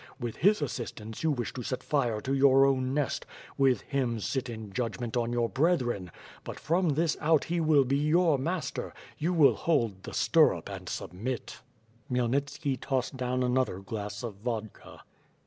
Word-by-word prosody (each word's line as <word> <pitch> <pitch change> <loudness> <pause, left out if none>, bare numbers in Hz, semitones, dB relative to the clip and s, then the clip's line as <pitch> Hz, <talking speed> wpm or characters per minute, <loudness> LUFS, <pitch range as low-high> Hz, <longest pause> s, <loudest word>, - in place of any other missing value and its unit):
With 120 -3 -4
his 200 -3 +3
assistance 115 -4 -5
you 160 - +2
wdsh 120 -2 -3
to 130 - -5
set 130 +2 -4
fire 120 -7 0
to 135 - -2
your 135 0 +6
own 130 -1 +1
nest; 145 0 -1 0.3
with 135 -2 +3
him, 125 -5 -1
sit 125 +3 -2
in 110 -3 -7
jud<rment 120 0 -3
on 120 -1 0
your 120 -1 +1
brethren! 125 - 0 0.3
But - - -7
from 170 -1 +1
this 160 0 +1
out 155 -1 +3
he 175 0 -1
will 155 -3 +4
be 135 +2 +1
your 155 0 +3
master; 170 +5 -3 0.2
you 165 +4 0
will 160 -6 +6
hold 115 - 0
the - - -9
stirrup - - +3
and - - -7
submit. 115 +11 -5 0.5
Khmyelnitski 135 +2 0
tossed 135 0 -1
down 125 0 -1
another 125 -5 +1
glass 105 +1 -6
of 110 -5 -5
vodka. 110 -1 -6
130 Hz, 165 wpm, -29 LUFS, 115-145 Hz, 0.5 s, your